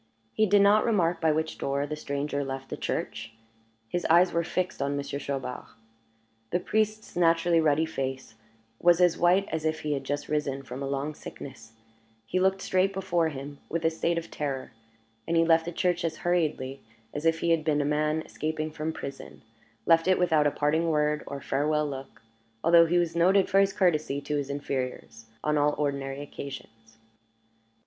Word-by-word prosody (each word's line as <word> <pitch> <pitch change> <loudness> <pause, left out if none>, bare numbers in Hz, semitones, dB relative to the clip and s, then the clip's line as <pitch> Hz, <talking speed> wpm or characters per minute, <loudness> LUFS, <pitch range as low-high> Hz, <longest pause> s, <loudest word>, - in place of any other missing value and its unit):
He 215 - +2
did 200 +1 +5
not 205 +2 +5
remark 180 -7 +1
by 160 -1 +3
which 160 +1 -2
door 140 +1 -1
the 150 +1 -4
stranger 140 -1 -3
left 135 0 -6
the - - -3
church 110 0 -4 0.5
his 175 +9 -2
eyes 175 +3 +5
were 170 - +1
fixed 180 0 -2
on 140 +1 -1
Monsieur 140 0 -4
Chaubard. 135 -3 -4 0.8
The 175 - +1
priest's 215 +2 -1
naturally 170 -1 +3
ruddy 155 0 +3
face 135 -5 -4 0.5
was 175 0 +5
as 180 -2 +4
white 180 +3 +4
as 160 -1 -2
if 155 0 -1
he 150 -1 -1
had 135 -1 -3
just 145 +2 -3
risen 140 -3 -2
from 130 +1 -7
a 140 - -2
long 140 +2 -2
sickness; 125 -6 -10 0.5
he 185 - -1
looked 190 +1 +1
straight 190 +1 +1
before 175 -4 0
him, 140 0 -8
with 165 0 -2
a 160 - +4
stare 170 +1 -1
of 170 - -5
terror, 135 -3 -4 0.6
and 170 - +1
he 165 - +4
left 165 0 +4
the 175 - -4
church 175 0 0
as 160 -2 -2
hurriedly 150 -6 0 0.3
as 145 - -4
if 165 0 +2
he 170 - +2
had 165 -2 +2
been 150 -1 +1
a 145 - 0
man 150 +2 0
escaping 155 0 -3
from 155 +1 -3
prison; 140 -2 -8 0.4
left 165 +1 +4
it 185 - +4
without 160 -4 +3
a - - +1
parting 160 +4 +1
word, 150 -1 +1
or 140 - -5
a - - -10
farewell 150 +2 0
look, 135 -3 -8 0.4
although 170 0 +6
he 175 +2 +2
was 170 -1 0
noted 185 +3 +4
for 195 - +3
his 195 0 +4
courtesy 155 -7 +1
to 145 +1 -3
his 140 -1 -3
inferiors 130 -5 -4 0.2
on 150 0 +1
all 145 +1 +2
ordinary 140 -1 -2
occasions. 115 -6 -10
155 Hz, 190 wpm, -27 LUFS, 140-170 Hz, 0.8 s, although